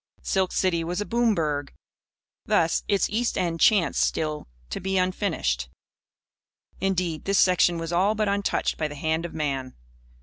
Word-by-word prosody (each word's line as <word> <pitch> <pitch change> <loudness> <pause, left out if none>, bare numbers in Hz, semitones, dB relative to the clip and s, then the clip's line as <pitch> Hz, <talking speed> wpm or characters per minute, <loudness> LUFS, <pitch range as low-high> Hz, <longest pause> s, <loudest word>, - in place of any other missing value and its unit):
Silk 190 -1 0
City 170 -3 +1
was 175 +3 -3
a 205 - -2
"boom 235 -1 +2
burg." 145 -4 -2 0.7
Thus, 165 0 +2
its 200 -2 +2
east 235 +3 0
end 170 -2 -1
chanced 200 -4 +3
still 155 -1 -1 0.2
to - - -3
be 190 +1 -1
unfinished. 165 - -1 1.1
Indeed, 180 -4 -1
this 195 0 +1
section 180 -2 +4
was 165 +1 -4
all 195 +5 +2
but 215 -1 0
untouched 200 0 0
by 155 - 0
the 145 - -8
hand 160 +3 -1
of - - -13
man. 135 -4 -3
175 Hz, 160 wpm, -25 LUFS, 160-195 Hz, 1.1 s, section